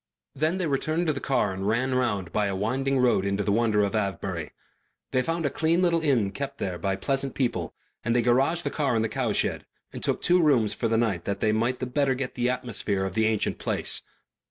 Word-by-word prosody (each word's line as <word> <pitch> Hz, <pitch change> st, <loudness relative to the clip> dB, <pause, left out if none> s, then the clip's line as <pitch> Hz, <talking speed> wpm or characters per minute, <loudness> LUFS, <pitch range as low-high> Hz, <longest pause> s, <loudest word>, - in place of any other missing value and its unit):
Then 155 Hz, +6 st, 0 dB
they 185 Hz, -, -1 dB
returned 155 Hz, +4 st, 0 dB
to 155 Hz, -, +2 dB
the 140 Hz, -, -4 dB
car 130 Hz, -8 st, 0 dB
and 95 Hz, +1 st, -3 dB
ran 130 Hz, +4 st, +1 dB
round 105 Hz, -8 st, 0 dB
by 105 Hz, -1 st, +1 dB
a 100 Hz, -, -2 dB
winding 135 Hz, +7 st, 0 dB
road 125 Hz, -6 st, +3 dB
into 100 Hz, +1 st, 0 dB
the 100 Hz, -, 0 dB
wonder 110 Hz, -1 st, +2 dB
of 100 Hz, -, -1 dB
Avebury. 95 Hz, -6 st, -2 dB, 0.6 s
They 130 Hz, -, +2 dB
found 165 Hz, +3 st, -2 dB
a 140 Hz, -, +1 dB
clean 165 Hz, +3 st, +1 dB
little 170 Hz, -2 st, +3 dB
inn 135 Hz, -8 st, +3 dB
there 100 Hz, -, -3 dB
kept 120 Hz, -9 st, -4 dB
by 95 Hz, -1 st, 0 dB
pleasant 135 Hz, +6 st, -2 dB
people, 105 Hz, -, -1 dB, 0.3 s
and 120 Hz, +1 st, 0 dB
they 120 Hz, -, +3 dB
garaged 135 Hz, +8 st, +2 dB
the -, -, -2 dB
car 140 Hz, -5 st, 0 dB
in 110 Hz, -, +2 dB
the 110 Hz, -, -1 dB
cowshed -, -, -1 dB, 0.3 s
and -, -, -6 dB
took -, -, -1 dB
two 180 Hz, 0 st, +4 dB
rooms 120 Hz, -9 st, +3 dB
for 115 Hz, -, -1 dB
the 115 Hz, 0 st, +1 dB
night 105 Hz, -7 st, 0 dB
that 100 Hz, -1 st, -2 dB
they 110 Hz, -, +2 dB
might 115 Hz, +4 st, +1 dB
the 130 Hz, -, -2 dB
better 135 Hz, +1 st, +1 dB
get 130 Hz, 0 st, -4 dB
the 125 Hz, 0 st, 0 dB
atmosphere 105 Hz, -6 st, -1 dB
of 95 Hz, -, -4 dB
the 110 Hz, +2 st, +2 dB
ancient 110 Hz, -2 st, 0 dB
place. -, -, 0 dB
120 Hz, 230 wpm, -26 LUFS, 100-140 Hz, 0.6 s, two